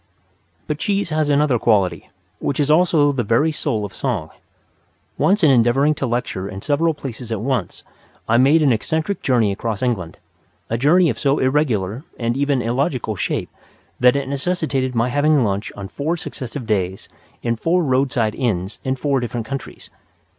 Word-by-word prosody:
But 150 Hz, -1 st, -3 dB
cheese 200 Hz, -2 st, 0 dB
has 155 Hz, -1 st, 0 dB
another 145 Hz, -4 st, +3 dB
quality, 95 Hz, -7 st, +1 dB, 0.3 s
which 140 Hz, -, -2 dB
is 145 Hz, 0 st, +2 dB
also 155 Hz, -3 st, +4 dB
the 135 Hz, -3 st, -1 dB
very 115 Hz, +8 st, +2 dB
soul 110 Hz, -8 st, -2 dB
of 100 Hz, -, -9 dB
song. 105 Hz, -, -3 dB, 0.8 s
Once 195 Hz, 0 st, +2 dB
in 150 Hz, -, +6 dB
endeavouring 130 Hz, +4 st, +4 dB
to 140 Hz, -2 st, -3 dB
lecture 115 Hz, -5 st, -2 dB
in 95 Hz, -1 st, -8 dB
several 155 Hz, +2 st, +1 dB
places 125 Hz, -4 st, -7 dB
at 110 Hz, -, -1 dB
once, 120 Hz, -4 st, -2 dB, 0.4 s
I 115 Hz, -, +3 dB
made 145 Hz, +6 st, +5 dB
an 140 Hz, -, +4 dB
eccentric 160 Hz, -, -2 dB
journey 120 Hz, -6 st, +2 dB
across 110 Hz, +2 st, -3 dB
England, 100 Hz, -10 st, -2 dB, 0.5 s
a 115 Hz, -, +1 dB
journey 165 Hz, +4 st, +4 dB
of 115 Hz, -, -7 dB
so 140 Hz, 0 st, +2 dB
irregular 130 Hz, -5 st, 0 dB
and 120 Hz, 0 st, -1 dB
even 140 Hz, -2 st, +1 dB
illogical 125 Hz, -2 st, -1 dB
shape -, -, -2 dB, 0.5 s
that 125 Hz, +1 st, +5 dB
it 140 Hz, -1 st, -1 dB
necessitated 140 Hz, -3 st, -1 dB
my 115 Hz, +2 st, +1 dB
having 145 Hz, +1 st, +3 dB
lunch 100 Hz, -1 st, -2 dB
on 100 Hz, -1 st, -6 dB
four 155 Hz, -, -2 dB
successive 130 Hz, -5 st, -6 dB
days 95 Hz, -4 st, -1 dB, 0.4 s
in 115 Hz, -1 st, 0 dB
four 170 Hz, +9 st, +1 dB
roadside 130 Hz, -5 st, +1 dB
inns 100 Hz, -6 st, -2 dB
in 130 Hz, 0 st, -1 dB
four 140 Hz, 0 st, 0 dB
different 120 Hz, -2 st, -4 dB
counties. 135 Hz, +1 st, -7 dB
130 Hz, 170 wpm, -20 LUFS, 115-145 Hz, 0.8 s, in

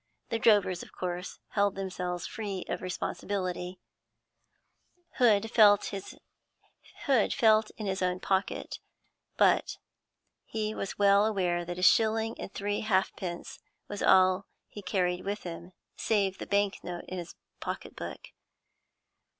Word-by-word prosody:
The 230 Hz, -, -1 dB
drovers 205 Hz, -5 st, +4 dB
of -, -, -11 dB
course 180 Hz, 0 st, -5 dB
held 200 Hz, -1 st, +1 dB
themselves 180 Hz, -2 st, -4 dB
free 205 Hz, -6 st, -5 dB
of -, -, -3 dB
responsibility. 185 Hz, 0 st, -3 dB, 1.4 s
Hood 225 Hz, -3 st, +4 dB
felt 205 Hz, -3 st, +5 dB, 1.2 s
in 220 Hz, -4 st, +3 dB
his 190 Hz, -1 st, -2 dB
own 180 Hz, 0 st, 0 dB
pocket; 190 Hz, +1 st, -1 dB, 0.6 s
but -, -, +3 dB, 0.7 s
he 215 Hz, -1 st, -3 dB
was 195 Hz, -, -5 dB
well 200 Hz, 0 st, +5 dB
aware 180 Hz, -5 st, 0 dB
that 175 Hz, +1 st, -5 dB
a 180 Hz, -, -3 dB
shilling 225 Hz, +3 st, +4 dB
and -, -, -6 dB
three 205 Hz, +1 st, -2 dB
halfpence 190 Hz, -4 st, -2 dB, 0.3 s
was 205 Hz, -, -6 dB
all 185 Hz, +1 st, +4 dB, 0.2 s
he 205 Hz, -, -9 dB
carried 180 Hz, -2 st, 0 dB
with 205 Hz, +1 st, -3 dB
him 175 Hz, +1 st, -7 dB, 0.2 s
save 200 Hz, -4 st, 0 dB
the -, -, -6 dB
bank 200 Hz, -1 st, +1 dB
note 175 Hz, -1 st, -6 dB
in 185 Hz, -, -5 dB
his 170 Hz, -1 st, -8 dB, 0.2 s
pocket -, -, -5 dB
book. -, -, -7 dB
195 Hz, 125 wpm, -29 LUFS, 180-210 Hz, 1.4 s, felt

